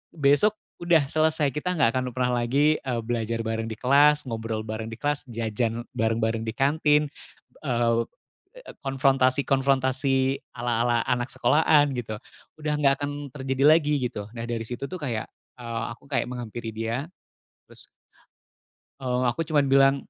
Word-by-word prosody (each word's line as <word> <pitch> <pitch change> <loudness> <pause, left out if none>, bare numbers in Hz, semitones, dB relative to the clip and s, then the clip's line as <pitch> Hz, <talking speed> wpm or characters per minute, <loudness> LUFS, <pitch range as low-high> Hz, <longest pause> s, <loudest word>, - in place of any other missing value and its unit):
besok 145 +9 +4 0.2
udah 170 -4 +3
selesai, 155 -2 +2
kita 180 +4 -2
nggak 135 -7 +3
akan 130 - 0
pernah 125 -1 +1
lagi, 145 +5 +2
eee, 125 -3 -3
belajar 115 -1 -2
bareng 115 0 -2
di 110 - -5
kelas, 145 +3 +4
ngobrol 110 -2 -4
bareng 110 0 -5
di 115 - -8
kelas, 145 +1 -2
jajan 115 +1 -2
bareng-bareng 115 0 0
di 110 - -2
kantin, 150 +1 +3 0.6
eee 115 -2 +2 0.5
eee, - - -12
konfrontasi-konfrontasi 135 0 +2 0.2
ala-ala 120 -1 +1
anak 125 +1 0
sekolahan, 145 +2 +3
gitu, 110 -3 -4 0.4
udah 150 0 -1
nggak 140 -2 +4
akan 145 0 -2 0.2
terjadi 135 0 -1
lagi, 150 -2 -1
gitu. 115 -5 -3
Nah, 115 -1 -6
dari 115 -1 -3
situ, 125 +4 -5
tuh, 185 -1 -6
kayak, 120 -7 -3 0.3
eee, 115 -1 -4
aku 120 - -12
kayak - - 0
menghampiri 120 -2 -6
dia, 115 +5 -2 0.6
terus - - -10 1.1
eee, 125 -1 -1
aku 165 +6 -2
cuman 150 -3 +2
bilang, 135 0 +5
130 Hz, 145 wpm, -25 LUFS, 115-145 Hz, 1.1 s, bilang